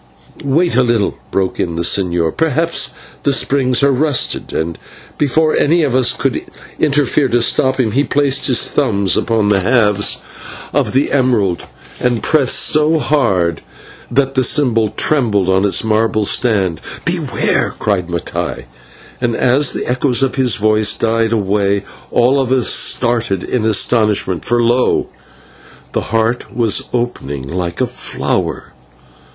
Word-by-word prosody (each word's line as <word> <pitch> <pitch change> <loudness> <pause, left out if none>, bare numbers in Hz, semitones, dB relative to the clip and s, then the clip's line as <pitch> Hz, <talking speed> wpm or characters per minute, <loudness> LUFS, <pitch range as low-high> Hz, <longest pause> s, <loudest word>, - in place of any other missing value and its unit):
"Wait 155 +3 +1
a 130 - +4
little," 120 -5 0
broke 95 -1 -2
in 85 -2 -2
the 85 - -2
señor, 85 -3 0
"perhaps 160 +2 0 0.3
the 140 - +1
springs 135 -1 +1
are 140 - +4
rusted." 145 +1 0
And 80 +1 -3 0.4
before 155 +2 +1
any 165 +3 +2
of 140 -5 0
us 130 -2 +3
could - - -2 0.4
interfere 145 -1 +2
to 120 -1 +1
stop 130 +3 +1
him, 115 -4 +1
he 135 +6 +1
placed 140 -2 +1
his 125 -3 +2
thumb 105 -9 0
upon 110 -3 0
the 100 -1 +3
halves 105 -1 +2 0.6
of - - 0
the 135 +3 +1
emerald 120 -10 +1 0.3
and 120 -3 -1
pressed 140 -5 +2
so 155 +1 +3
hard 95 - 0 0.5
that 135 +2 0
the 130 -1 +1
symbol 115 -5 +2
trembled 110 - 0
on 95 +2 +2
its 100 - +2
marble 110 -1 +1
stand. 100 -9 +1 0.2
"Beware!" - - -1
cried 100 -5 -1
Mattai, 85 -1 -4 0.6
and 120 -2 0
as 130 +5 +2
the - - -4
echoes 125 +1 0
of 135 - 0
his 130 -5 +1
voice 110 0 +2
died 115 0 0
away 100 -2 0 0.3
all 130 +3 +2
of 130 -1 -3
us 130 -2 +2
started 115 -6 +1
in 115 -3 -1
astonishment, 105 -4 +1
for 120 0 +1
lo! 120 +2 +1 0.8
the - - -1
heart 115 +2 -1
was 115 -3 +2
opening 120 - -3
like 85 +1 -4
a - - +2
flower. - - -4
120 Hz, 145 wpm, -15 LUFS, 100-135 Hz, 0.8 s, a